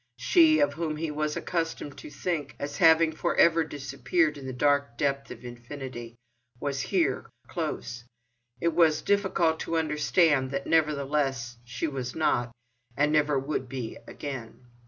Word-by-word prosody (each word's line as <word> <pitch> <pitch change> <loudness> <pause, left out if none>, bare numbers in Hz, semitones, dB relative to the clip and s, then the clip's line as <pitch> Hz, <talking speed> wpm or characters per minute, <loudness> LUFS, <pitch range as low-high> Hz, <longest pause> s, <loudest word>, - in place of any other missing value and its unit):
She, 320 -3 +5
of 290 - +3
whom 160 -2 -2
he 160 0 -2
was 150 0 -2
accustomed 165 -4 -3
to - - -9
think 145 -1 -3
as 140 - -5
having 165 -2 +6
for 165 +2 -1
ever 165 -1 +5
disappeared 240 - 0
in 140 -2 -8
the - - -3
dark 140 -1 +1
depth 140 -1 -1
of - - -10
infinity, 120 -1 -8 0.4
was 140 0 -2
here, 140 -2 0 0.2
close—and 120 +1 -4 0.5
it 170 -1 +1
was 155 -2 +3
difficult 185 -5 +2
to 165 - -2
understand 150 -2 +2
that 140 +1 -3
nevertheless 140 -6 0
she 120 +5 -3
was 130 -4 -4
not, 120 -6 +1 0.5
and 145 +1 +3
never 150 -2 +3
would 135 -1 -2
be 125 -4 -5
again. 130 -3 -7
145 Hz, 150 wpm, -28 LUFS, 130-160 Hz, 0.5 s, having